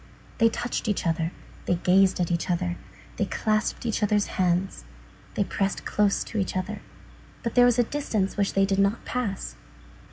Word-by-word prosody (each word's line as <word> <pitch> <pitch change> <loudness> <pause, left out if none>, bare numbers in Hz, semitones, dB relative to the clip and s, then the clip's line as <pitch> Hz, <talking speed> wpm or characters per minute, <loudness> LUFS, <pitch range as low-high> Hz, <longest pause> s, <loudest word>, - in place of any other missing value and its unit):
They 230 - +6
touched 240 +1 -3
each 205 -3 0
other, 165 0 0 0.4
they 180 - +3
gazed 185 +2 +3
at 175 -1 0
each 170 +1 -1
other, 90 - 0 0.4
they - - +1
clasped 215 +2 -1
each 225 -1 -1
other's 210 0 +2 0.2
hands, 180 - 0 0.5
they - - +2
pressed 195 0 -2
close 205 -1 +2
to 220 - -4
each 190 -1 -1
other; 195 +2 -4 0.6
but 235 - -2
there 245 -1 +6
was 245 -1 +4
a 245 - +5
distance 220 -7 -2
which 200 -1 0
they 195 0 +4
did 195 0 0
not 200 +3 +1
pass. 215 -6 -3
200 Hz, 180 wpm, -26 LUFS, 185-220 Hz, 0.6 s, They